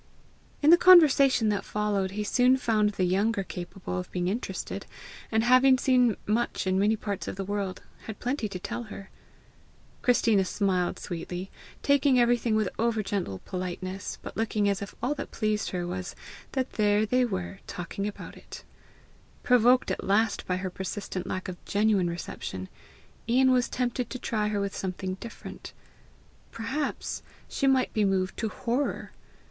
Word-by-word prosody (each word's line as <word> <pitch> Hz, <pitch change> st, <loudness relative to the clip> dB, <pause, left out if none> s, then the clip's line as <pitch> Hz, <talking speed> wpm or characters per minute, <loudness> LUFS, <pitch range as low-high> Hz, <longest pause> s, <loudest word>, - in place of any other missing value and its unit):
In 300 Hz, -, +7 dB
the 345 Hz, -, +9 dB
conversation 280 Hz, -10 st, +7 dB
that 205 Hz, -1 st, 0 dB
followed, 210 Hz, -2 st, -1 dB
he 210 Hz, -, 0 dB
soon 250 Hz, +4 st, +4 dB
found 215 Hz, -4 st, +1 dB
the 185 Hz, -, -1 dB
younger 195 Hz, +3 st, +1 dB
capable 180 Hz, 0 st, -5 dB
of 180 Hz, -, -6 dB
being 180 Hz, 0 st, -1 dB
interested, 225 Hz, +6 st, -4 dB, 0.4 s
and, 220 Hz, 0 st, +2 dB
having 255 Hz, +2 st, +6 dB
seen 250 Hz, -4 st, +3 dB
much 225 Hz, +1 st, 0 dB
in 190 Hz, 0 st, +1 dB
many 210 Hz, +3 st, +3 dB
parts 205 Hz, -2 st, -4 dB
of -, -, -4 dB
the 195 Hz, 0 st, -4 dB
world, 200 Hz, -2 st, -3 dB, 0.2 s
had 220 Hz, -, -7 dB
plenty 245 Hz, -3 st, -2 dB
to 195 Hz, -, -5 dB
tell 235 Hz, +6 st, -5 dB
her. 195 Hz, -2 st, -9 dB, 0.9 s
Christina 230 Hz, -5 st, +3 dB
smiled 185 Hz, -2 st, 0 dB
sweetly, 180 Hz, +2 st, -6 dB, 0.3 s
taking 280 Hz, -2 st, +4 dB
everything 240 Hz, -2 st, +3 dB
with 215 Hz, -2 st, +2 dB
over 225 Hz, -1 st, +1 dB
gentle 190 Hz, -, -3 dB
politeness, 185 Hz, +1 st, -5 dB
but -, -, -8 dB
looking 215 Hz, -2 st, 0 dB
as 200 Hz, -1 st, 0 dB
if 200 Hz, -, -7 dB
all 260 Hz, +4 st, +1 dB
that -, -, -5 dB
interested 215 Hz, -1 st, 0 dB
her 175 Hz, -, -2 dB
was, 180 Hz, +1 st, -5 dB, 0.4 s
that 260 Hz, -1 st, -1 dB
there 210 Hz, 0 st, +2 dB
they 250 Hz, +4 st, +2 dB
were, 190 Hz, -4 st, -3 dB
talking 200 Hz, +1 st, -4 dB
about 210 Hz, -, -8 dB
it. -, -, -11 dB, 0.8 s
Provoked 250 Hz, +1 st, +4 dB
at -, -, -3 dB
last 215 Hz, +3 st, +1 dB
by 180 Hz, -, 0 dB
her 185 Hz, 0 st, -4 dB
persistent 190 Hz, 0 st, -5 dB
lack 185 Hz, -, -3 dB
of 180 Hz, -1 st, -8 dB
GENUINE 205 Hz, -3 st, +2 dB
reception, 95 Hz, -, -6 dB, 0.6 s
Ian 260 Hz, +2 st, +5 dB
was 250 Hz, -1 st, +2 dB
tempted 250 Hz, -1 st, -2 dB
to 255 Hz, -, -4 dB
try 215 Hz, -4 st, -1 dB
her 210 Hz, -1 st, -1 dB
with 200 Hz, -1 st, -2 dB
something 185 Hz, 0 st, -3 dB
different: 235 Hz, -, -9 dB, 0.8 s
perhaps 265 Hz, +6 st, -3 dB, 0.3 s
she 275 Hz, -, -1 dB
might 265 Hz, -1 st, +3 dB
be 215 Hz, -, +2 dB
moved 190 Hz, -1 st, +1 dB
to 220 Hz, -, -1 dB
horror! 245 Hz, +6 st, -2 dB
210 Hz, 165 wpm, -28 LUFS, 190-245 Hz, 0.9 s, the